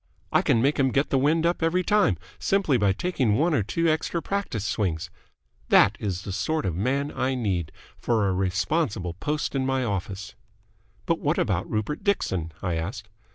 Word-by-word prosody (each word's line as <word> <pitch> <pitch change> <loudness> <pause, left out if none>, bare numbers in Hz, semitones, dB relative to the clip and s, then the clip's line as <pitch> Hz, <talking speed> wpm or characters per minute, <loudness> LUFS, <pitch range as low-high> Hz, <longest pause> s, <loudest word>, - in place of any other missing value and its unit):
I - - +4
can 115 - +2
make 145 +2 +2
him 135 -1 +4
get 140 +3 0
the 135 - +3
wind 160 +4 +2
up 175 +1 +1
every 170 +3 +2
time, 205 - +3 0.2
simply 195 -8 +2
by 105 -4 +3
taking 125 - 0
one 165 +4 +2
or 135 - +3
two 165 +11 0
extra 160 +2 0
practice 165 - -3
swings! 85 -8 -1 0.6
That 100 +1 +6
is 95 -3 -3
the 100 - -5
sort 155 +8 -1
of 90 - 0
man 135 - 0
I 130 +1 0
need 95 -10 -1 0.3
for 110 -4 +1
a 95 - +1
responsible 95 - 0
post 150 - -2
in 135 -1 0
my 135 0 0
office." 100 -3 -4 0.7
"But 165 - +1
what 150 +3 0
about 95 -7 0
Rupert 110 - -2
Dixon?" 95 - 0
I 90 -3 -1
asked. 95 +5 -5
125 Hz, 185 wpm, -25 LUFS, 95-155 Hz, 0.7 s, That